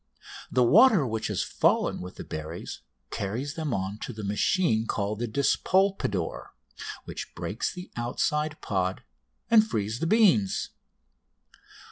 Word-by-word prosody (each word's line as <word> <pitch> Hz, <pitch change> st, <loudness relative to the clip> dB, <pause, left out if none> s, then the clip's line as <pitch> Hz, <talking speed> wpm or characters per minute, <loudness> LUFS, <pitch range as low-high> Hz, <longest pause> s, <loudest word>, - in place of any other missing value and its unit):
The 125 Hz, -, +4 dB
water 195 Hz, -, +6 dB
which 110 Hz, -2 st, -2 dB
has -, -, -1 dB
fallen -, -, +1 dB
with 90 Hz, 0 st, -8 dB
the -, -, -7 dB
berries 80 Hz, +2 st, -6 dB, 0.3 s
carries 115 Hz, +9 st, -3 dB
them 155 Hz, -3 st, -3 dB
on 95 Hz, 0 st, -3 dB
to -, -, -5 dB
the 110 Hz, -2 st, -8 dB
machine 110 Hz, -, +1 dB
called 100 Hz, +1 st, -2 dB
the 120 Hz, -, -1 dB
despolpador, 140 Hz, -, 0 dB, 0.5 s
which -, -, -7 dB
breaks 105 Hz, -, -3 dB
the 180 Hz, 0 st, -9 dB
outside 150 Hz, +6 st, -1 dB
pod 95 Hz, -2 st, -1 dB, 0.5 s
and 225 Hz, -2 st, +8 dB
frees 110 Hz, -, -2 dB
the 165 Hz, -, -1 dB
beans. 180 Hz, -, +3 dB
115 Hz, 130 wpm, -27 LUFS, 100-160 Hz, 0.5 s, and